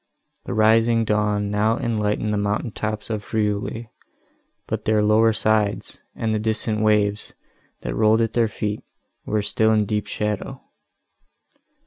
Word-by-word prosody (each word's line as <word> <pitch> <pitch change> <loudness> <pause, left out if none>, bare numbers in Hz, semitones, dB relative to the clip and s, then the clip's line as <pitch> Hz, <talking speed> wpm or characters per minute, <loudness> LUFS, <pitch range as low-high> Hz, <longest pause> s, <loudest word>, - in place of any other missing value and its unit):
The - - -4
rising 115 +1 +4
dawn 105 -1 0
now 110 +2 +1
enlightened 105 -4 -1
the - - 0
mountain 105 +3 -1
tops 110 +1 -4
of 105 -2 -3
Friuli, 110 +2 -2 0.7
but - - -4
their 110 0 +3
lower 110 +2 +4
sides, 110 -2 0 0.2
and 110 -1 -1
the 110 - 0
distant 110 0 -1
waves, 105 -1 +1 0.5
that - - -4
rolled 110 +1 +3
at 115 - 0
their 115 -2 +2
feet, 105 -1 -4 0.5
were 105 -1 0
still 110 +1 +2
in 105 -1 +2
deep 105 0 -2
shadow. 105 -2 -3
110 Hz, 140 wpm, -22 LUFS, 105-110 Hz, 0.7 s, rising